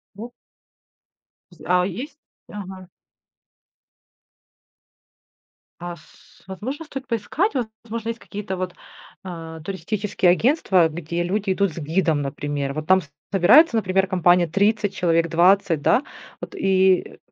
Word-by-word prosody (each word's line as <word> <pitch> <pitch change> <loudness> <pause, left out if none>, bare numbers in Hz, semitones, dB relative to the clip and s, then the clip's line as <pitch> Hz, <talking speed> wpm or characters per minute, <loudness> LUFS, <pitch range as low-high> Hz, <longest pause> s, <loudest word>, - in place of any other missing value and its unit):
Во 230 +4 -8 1.2
В 175 - -17
з - - -16
а, 180 +1 +2
есть 275 - -7 0.3
ага. 190 -2 -9 2.9
А 175 0 -6
с 155 - -22
возможно, 255 - -6
стоит 270 -3 -8
поискать? 255 - -1 0.3
Возможно, 230 0 -5
есть 230 0 -4
какие-то 200 -2 -6
вот, 180 -1 -4 0.5
а, 165 -3 -8
туристические 190 +1 0
агентства, 190 - +3
где 170 +2 -4
люди 195 +2 -1
идут 195 -3 0
с - - -14
гидом, 160 -1 0
например. 140 0 -3
Вот 155 +1 -5
там 185 0 +5 0.3
собирается, 230 - +6
например, 190 -3 +1
компания 180 -2 +3
30 205 +3 +1
человек, 165 -2 +1
20, 175 -2 +3
да. 255 - +3 0.4
Вот, - - -8
и 190 -1 +2
185 Hz, 120 wpm, -22 LUFS, 170-210 Hz, 2.9 s, собирается